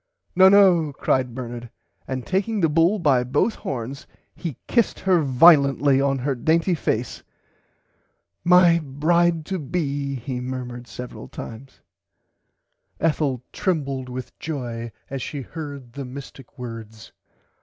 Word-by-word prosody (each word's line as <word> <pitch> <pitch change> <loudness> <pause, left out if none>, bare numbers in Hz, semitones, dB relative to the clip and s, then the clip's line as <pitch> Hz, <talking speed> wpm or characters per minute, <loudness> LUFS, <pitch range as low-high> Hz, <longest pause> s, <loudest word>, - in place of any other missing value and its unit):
No 190 +1 +8
no 185 -6 +5
cried 130 -2 0
Bernard 120 -2 -6 0.4
and 130 -2 -4
taking 205 +3 0
the 165 -4 +3
bull 165 +7 +3
by 140 -9 +3
both 135 - +1
horns 130 +3 -6 0.3
he 160 -8 -5
kissed 235 -3 +1
her 185 -3 +3
violently 140 -1 +5
on 135 -1 +1
her 135 +2 -1
dainty 165 +8 +1
face. 125 -7 -2 1.2
My 175 -1 +6
bride 160 +3 +1
to 190 +1 -3
be 140 -2 -2
he 125 0 -4
murmered 125 -1 -6
several 125 - -8
times. 120 - -10 1.2
[Pg - - -25
93] 165 - +4
Ethel 140 -5 -1
trembled 140 -8 -2
with 125 0 -8
joy 120 -7 -5 0.2
as 135 -1 -3
she 145 +2 -5
heard 140 -5 -8
the 140 - -5
mistick 135 0 -10
words. 115 -3 -9
140 Hz, 135 wpm, -23 LUFS, 125-165 Hz, 1.2 s, No